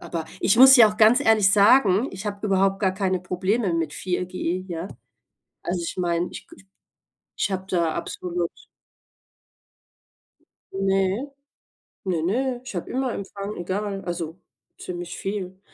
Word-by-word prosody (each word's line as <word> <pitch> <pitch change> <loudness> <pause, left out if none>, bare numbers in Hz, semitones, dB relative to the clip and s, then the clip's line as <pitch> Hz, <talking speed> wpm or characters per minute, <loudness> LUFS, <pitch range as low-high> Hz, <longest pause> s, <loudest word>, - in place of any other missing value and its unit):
aber 165 -2 -5 0.2
ich 200 - +3
muss 265 +1 +10
ja 230 -3 +8
auch 210 - -9
ganz 225 +4 +5
ehrlich 220 -7 +4
sagen, 205 +2 +5
ich 190 +3 -7
habe 205 0 -5
überhaupt 195 0 +1
gar 190 -2 +2
keine 190 -2 -1
Probleme 185 +3 -1
mit 160 -3 -2
4G, 180 0 -3
ja? 170 +1 -5 0.8
Also 175 0 -2
ich 170 - -5
meine, 175 0 0
ich - - -10
k - - -15
ich 190 - -19 0.7
ich - - -1
habe 190 -1 -3
da 170 -4 0
absolut 175 0 -3 2.2
Ne, 195 +6 0 0.7
ne, 175 -4 -1
ne, 245 +7 -1
ich 255 - -8
habe 175 - -5
immer 260 -1 -1
Empfang, 200 +1 -6
egal 195 +2 -3
also, 170 -1 -5 0.4
ziemlich 175 -1 -7
viel. 190 -1 -5
190 Hz, 145 wpm, -24 LUFS, 175-210 Hz, 2.2 s, muss